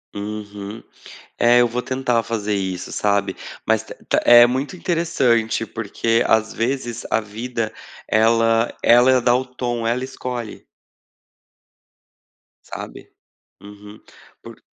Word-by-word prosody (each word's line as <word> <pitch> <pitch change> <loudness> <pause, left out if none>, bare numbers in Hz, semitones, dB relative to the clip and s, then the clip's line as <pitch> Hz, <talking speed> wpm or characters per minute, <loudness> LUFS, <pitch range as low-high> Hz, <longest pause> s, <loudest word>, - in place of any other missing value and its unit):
Uhum. 105 +1 -7 0.6
É, 120 +1 +5
eu 120 - +4
vou 125 +2 -2
tentar 125 -3 0
fazer 110 -2 -3
isso, 95 -2 -3
sabe. 100 -1 0 0.3
Mas - - +1
t - - -10 0.2
té - - +3
é 120 0 +9
muito 130 +7 -2
interessante, 130 -11 0
porque, 115 +1 -1
às 110 0 +2
vezes, 120 0 -3
a 110 - +1
vida 110 +1 -4 0.4
ela 115 +1 +2
ela 125 +2 +5
dá 120 0 +3
o 130 +1 -1
tom, 120 -2 -3
ela 125 +2 0
escolhe. 125 -3 -6 2.0
Sabe? - - -9 0.5
Uhum. 105 +1 -13 0.4
Por - - -12
115 Hz, 120 wpm, -21 LUFS, 110-125 Hz, 2.0 s, é